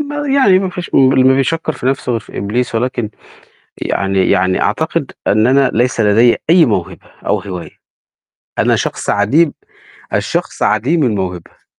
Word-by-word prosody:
ما 290 0 -4
يعني، 265 -9 +4
ما 190 -1 -2
فيش 180 -2 -7
م 130 -1 +5
اللي 130 -1 +3
ما 130 0 +5
بيشكّر 155 +4 -1
في 125 - -6
نَفْسه 135 -1 -1
غير 115 - -1
في - - -11
إبليس، 115 +5 -2
ولكن 120 -2 -2 0.7
يعني 95 -1 0
يعني 95 -1 +2
أعتقد - - -1
إن 110 +3 +3
أنا 135 0 +3
ليس 120 0 +1
لدي 110 +3 +4
أي 170 -2 +6
موهبة 100 -8 -3 0.2
أو - - +1
هواية، 90 -4 -8 0.8
أنا - - +3
شخص - - -3
عديم 140 +11 +2 0.6
الشخص - - -2
عديم 140 +9 +1
الموهبة. 95 -7 -4
125 Hz, 160 wpm, -15 LUFS, 105-150 Hz, 0.8 s, أي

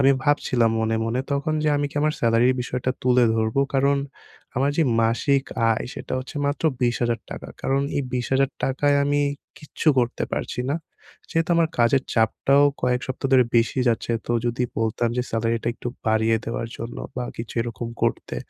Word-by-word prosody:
আমি 135 0 +6
ভাবছিলাম 125 -5 +2
মনে, 110 0 +1
মনে 115 +3 -1
তখন 140 +2 0
যে 150 - +3
আমি 145 0 0
কি - - -17
আমার 155 0 +2
সেলারির 115 +2 +3
বিষয়টা 125 +1 -2
তুলে 125 -1 +4
ধরবো? 110 +4 +1
কারণ 140 +1 +3 0.6
আমার 135 +2 +2
যে - - +5 0.2
মাসিক 135 +5 +2 0.3
আয় 110 - -2
সেটা - - -7
হচ্ছে 130 +3 -8
মাত্র 145 +3 -2 0.2
৳২০,০০০। 120 -1 -1
কারণ 135 +1 +1 0.2
এই 140 - +1
৳২০,০০০ 135 +2 +1
আমি 145 0 +1 0.4
কিচ্ছু 155 +1 -2
করতে 120 -1 0
পারছি - - -3
না। 145 - +1 0.5
যেহেতু 165 +1 0
আমার 165 -1 +3
কাজের 125 +3 +4
চাপটাও 135 +5 +3 0.2
কয়েক 125 0 +2
সপ্তাহ 130 +1 -3
ধরে 130 -1 +6
বেশি 115 +3 +2
যাচ্ছে। 120 0 0
তো - - 0
যদি 120 +1 -1 0.2
বলতাম 115 +1 0
যে 125 - +1
সেলারিটা 115 +1 0
একটু 120 - -5 0.2
বাড়িয়ে 110 +1 +3
দেওয়ার 115 0 -3
জন্য 115 +1 -6 0.2
বা 125 - -2
কিছু 115 0 -6
এরকম 115 0 -5
করতে। - - -1
125 Hz, 170 wpm, -23 LUFS, 115-140 Hz, 0.6 s, আমি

